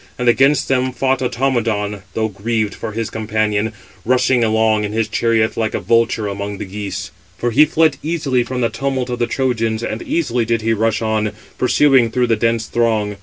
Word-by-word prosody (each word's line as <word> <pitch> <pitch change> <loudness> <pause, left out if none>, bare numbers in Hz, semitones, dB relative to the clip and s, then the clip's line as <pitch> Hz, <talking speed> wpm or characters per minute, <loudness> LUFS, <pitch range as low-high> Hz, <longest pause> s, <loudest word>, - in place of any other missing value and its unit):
And 125 - -2
against 135 +4 +4
them 130 -1 +1
561 - - -18
fought 130 +2 0 0.4
Automedon, 105 -2 -2
though 110 -1 +1
grieved 110 +1 -2
for 110 -2 -6
his 115 0 -3
companion, 110 -1 -1 0.3
rushing 125 0 +2
along 110 -1 +2
in 105 0 -3
his 110 -1 0
chariot 115 0 +1
like 110 -1 -1
a - - 0
vulture 115 -2 +1
among 100 0 -4
the - - -5
geese. 95 -1 -5 0.3
For 120 - -1
he 150 +7 +6
fled 155 -2 +2
easily 150 -6 0
from 125 +1 -4
the 115 - +2
tumult 130 +2 -2
of 120 - -3
the 120 - +1
Trojans, 115 -4 -1
and 115 0 -3
easily 125 -8 0
did 115 -1 -1
he 115 0 +2
rush 110 0 0
on, 110 -1 0 0.3
pursuing 130 -1 +4
through 125 +2 +1
the 115 -2 +2
dense 115 +1 0
throng. 110 -3 0
115 Hz, 195 wpm, -18 LUFS, 110-125 Hz, 0.4 s, he